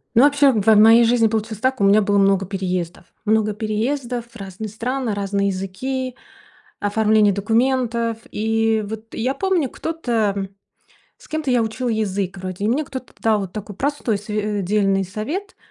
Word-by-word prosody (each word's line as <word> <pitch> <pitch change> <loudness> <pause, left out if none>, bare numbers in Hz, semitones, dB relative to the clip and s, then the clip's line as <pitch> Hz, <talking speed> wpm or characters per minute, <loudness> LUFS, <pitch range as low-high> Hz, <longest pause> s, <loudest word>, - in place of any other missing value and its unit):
Ну 235 - +7
вообще 285 0 +5
в 215 -4 0
в 220 +1 +5
моей 225 +3 +7
жизни 230 0 +3
получилось 220 -1 -2
так: 260 +2 0
у - - +3
меня 205 +2 +5
было 205 0 +2
много 195 -1 +3
переездов. 180 -3 -3 0.2
Много 215 -1 +2
переездов, 235 +4 -2
разные 200 0 -7
страны, 240 +3 -3
разные 200 0 -1
языки, 250 +8 -3 0.6
оформление 210 0 +3
документов. 230 +2 0
И 225 0 +1
вот, 220 +1 -8
я 255 +4 -1
помню 370 -6 0
кто-то 225 -12 -2 0.7
С - - -18
кем-то 310 -3 -2
я 245 -2 +3
учила 225 +3 -3
язык, 200 -4 -2
вроде, 185 +1 -5
и - - +2
мне 275 +7 +1
кто-то 260 -2 -8
дал 220 -2 +2
вот 190 -3 -6
такой 210 -2 -7
простой 270 -6 -1
св 210 -1 -2
дельный 195 0 +1
совет, 285 - -5
220 Hz, 160 wpm, -21 LUFS, 200-245 Hz, 0.7 s, Ну